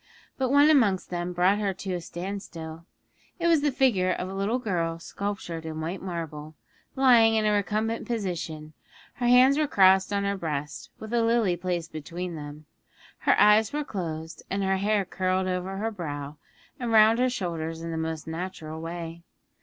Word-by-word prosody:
But 260 -2 -1
one 285 +3 +6
amongst 210 -13 +2
them 175 0 -2
brought 180 +3 +2
her 200 -3 -1
to 190 0 -4
a 175 - -3
standstill: 170 -3 -7 0.5
it 340 - -3
was 330 -3 +4
the 290 0 +2
figure 230 -9 +2
of 180 - -2
a 190 - -6
little 200 +5 0
girl 170 -8 -2
sculptured 175 -2 -5
in 160 -1 -5
white 170 +4 -4
marble, 160 -4 -6 0.4
lying 240 -4 +5
in 215 -1 +2
a 210 - +3
recumbent 215 +2 -1
position; 170 -8 -4 0.4
her 245 - 0
hands 255 +4 +6
were 305 - +2
crossed 190 -3 +5
on 200 0 0
her 200 0 0
breast, 150 -5 -4
with 220 +1 -8
a 235 - +3
lily 230 -5 +2
placed 175 -2 -3
between 170 +3 -5
them, 150 0 -9 0.5
her - - +3
eyes 210 +1 +5
were 295 +1 -2
closed, 160 - -5
and 195 +1 -1
her 190 0 +1
hair 205 0 +1
curled 185 +1 0
over 185 +1 -3
her 220 +3 -2
brow 145 -6 -6 0.4
and 240 -2 -2
round 220 +1 +6
her 255 0 +3
shoulders 165 -7 -4
in 165 - -4
the - - -3
most 160 -1 -3
natural 160 -2 -6
way. 165 0 -6
185 Hz, 180 wpm, -27 LUFS, 165-220 Hz, 0.5 s, one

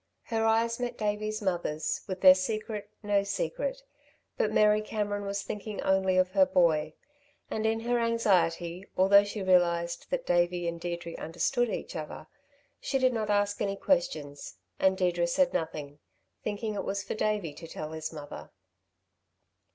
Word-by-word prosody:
Her 225 -2 -1
eyes 230 +1 +2
met 245 -1 -3
Davey's 215 +1 -2
mother's 175 -5 -1
with 185 -2 -5
their 185 -1 +10
secret 210 +2 -3
no 205 -1 +2
secret; - - -3 0.5
but - - 0
Mary 210 0 +4
Cameron 205 -1 -3
was 200 0 -2
thinking 210 0 -6
only 190 -1 +2
of 185 0 +3
her 190 -1 +4
boy, 155 -3 +2 0.6
and 220 0 0
in 225 0 0
her 240 +1 +1
anxiety, 185 -7 +1
although 200 +2 +7
she 205 0 -5
realised 170 -2 +2
that - - -2
Davey 175 0 +1
and 170 0 -4
Deirdre 170 -1 -4
understood 200 +10 0
each - - -5
other, 155 0 -6 0.5
she 270 - -1
did 255 -1 +3
not 220 -2 -2
ask 205 0 +1
any 200 -1 0
questions, 155 - -1 0.2
and 190 0 +3
Deirdre 175 -2 +1
said 270 +9 +2
nothing, 150 -3 -4 0.4
thinking 215 +1 -3
it 205 - -3
was 200 0 -2
for 195 - -4
Davey 210 -7 -1
to 165 - -10
tell 155 -1 -6
his 160 0 -5
mother. 150 -2 -9
200 Hz, 160 wpm, -29 LUFS, 170-215 Hz, 0.6 s, their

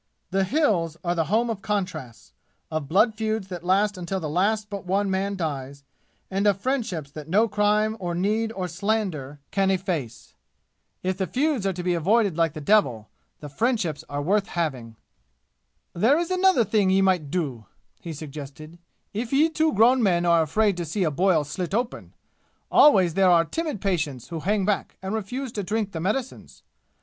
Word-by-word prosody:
The 195 0 +2
"Hills" 185 - +1
are 175 -1 0
the 165 -2 0
home 225 +7 +1
of 205 -3 -5
contrasts, 160 - -4 0.4
of 155 -3 -3
blood 215 - +3
feuds 215 -2 -2
that 175 -2 -6
last 195 +2 +1
until 185 +2 -3
the 160 - -4
last 205 +5 +1
but 200 -2 -6
one 195 +2 0
man 195 +1 -1
dies, 140 -5 -4 0.5
and 195 +2 +1
of 200 -2 +2
friendships 200 - -2
that 150 0 -9
no 210 +7 +3
crime 210 +1 +1
or 175 -2 -3
need 215 +5 0
or 185 -3 -3
slander 175 -7 -2
can 195 -1 +2
efface. 175 - -3 0.7
If 185 +1 -2
the 190 - 0
feuds 265 - 0
are 195 - 0
to 180 0 -5
be 180 0 +1
avoided 195 +3 +2
like 165 -2 +1
the 155 - -6
devil, 135 - +2 0.3
the 150 - -7
friendships 175 - -1
are 145 0 -3
worth 200 +5 +1
having. 135 - -3 1.0
"There 230 - +3
is 345 +1 -2
another 370 -7 +4
thing 205 -2 +2
ye 190 +1 +3
might 180 -6 +1
do," 140 - -3 0.3
he 170 - -7
suggested, 155 +1 -9 0.3
"if 225 +3 -3
ye 295 +4 +4
two 315 0 +1
grown 245 +2 +4
men 175 -5 +2
are 170 -1 +4
afraid 200 +5 +1
to 175 - -2
see 185 +5 -1
a 160 - +1
boil 175 0 +2
slit 180 +6 -4
open. 240 +1 -3 0.6
Always 190 - +6
there 190 +1 +4
are 170 -1 +5
timid 305 - -3
patients 155 - -2
who 165 -2 -4
hang 200 +3 0
back 205 0 -1
and 190 +2 -3
refuse 240 +5 -4
to 210 - -3
drink 205 +1 -2
the 165 - -5
medicines. 225 +9 -4
190 Hz, 180 wpm, -25 LUFS, 165-215 Hz, 1.0 s, Always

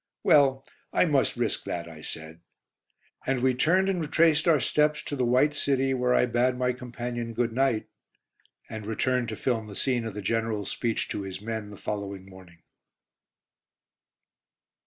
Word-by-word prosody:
"Well, 135 -2 +4 0.3
I - - +3
must - - +1
risk - - -1
that," 85 -1 -4
I 80 -2 -11
said. 80 +1 -8 0.9
And 130 -2 +1
we 130 -1 +4
turned 180 +9 +3
and 190 -3 0
retraced 160 +1 +3
our 160 -3 +5
steps 150 +5 +1
to 145 - -4
the 130 - 0
"White 130 +5 +3
City," 135 -2 +1
where 125 -1 +2
I - - +4
bade 125 +1 +1
my 125 0 +1
companion 120 -2 -5
good 120 -1 0
night, 130 -3 +1 0.8
and 110 -2 -7
returned 125 +2 0
to 110 - -4
film 115 -2 -1
the 100 - -9
scene 125 0 0
of 110 -3 -5
the 105 - -5
General's 110 -1 -1
speech 115 -2 -1
to - - -3
his 95 -1 -6
men 110 0 -5
the 105 - -10
following 100 -2 -5
morning. 95 -3 -15
120 Hz, 165 wpm, -27 LUFS, 105-135 Hz, 0.9 s, our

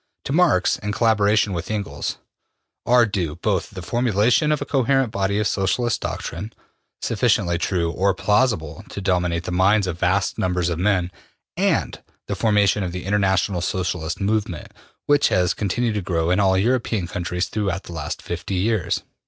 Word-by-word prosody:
To 135 - -2
Marx, 165 - +3
in 105 - -3
collaboration 105 -2 +2
with 85 -1 -4
Engels, 105 -2 -3 0.7
are 120 0 +5
due 90 -8 -2
both 95 +1 -1
the 95 -3 -8
formulation 120 - +2
of 150 - +1
a - - -4
coherent 135 -2 +1
body 100 -1 0
of 105 - 0
Socialist 100 +5 0
doctrine, 100 +7 -5 0.5
sufficiently 85 -1 +1
true 85 -2 0
or 95 +2 +1
plausible 105 - 0
to - - -6
dominate 90 -3 0
the 90 - -5
minds 95 +3 +3
of 90 -2 -4
vast 95 +3 +1
numbers 90 -2 0
of 85 -1 -3
men, 90 -2 +1 0.4
and - - 0 0.2
the - - -3
formation 105 -2 +2
of 90 -2 -3
the 90 0 -5
International 95 -2 +1
Socialist 90 -3 -2
movement, 100 -4 -2 0.3
which 145 0 +4
has 90 -1 +2
continued 110 +3 -1
to 105 - -2
grow 85 -2 0
in 90 - +2
all 95 -2 +3
European 115 -2 0
countries 90 +1 -3
throughout 95 -4 -2
the 85 - -10
last 75 -3 -5
fifty 95 - -4
years. 105 0 0
95 Hz, 165 wpm, -22 LUFS, 90-110 Hz, 0.7 s, are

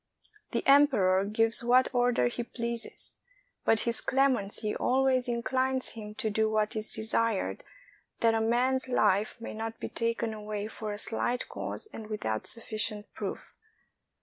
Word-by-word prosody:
The - - -2
emperor 230 -10 +4
gives 225 +3 +4
what 250 +3 +3
order 245 - +2
he 120 - -2
pleases; 235 -1 -1 0.5
but 225 -1 +3
his 235 -2 -1
clemency 240 -6 0
always 260 -1 +2
inclines 255 +2 0
him 210 -2 -8
to 220 -2 -2
do 220 +1 +1
what 215 0 0
is 215 0 -4
desired, 220 -1 0 0.6
that 230 -1 +4
a 225 - +1
man's 255 +3 +1
life 210 -2 +1
may 230 - -7
not 225 +1 -5
be - - -5
taken 230 -1 -2
away 210 -1 -5
for 215 -1 -6
a 205 - -5
slight 240 +3 -1
cause - - -5
and 220 - -8
without 110 - -3
sufficient 215 -2 0
proof. - - -6
225 Hz, 150 wpm, -29 LUFS, 215-245 Hz, 0.6 s, emperor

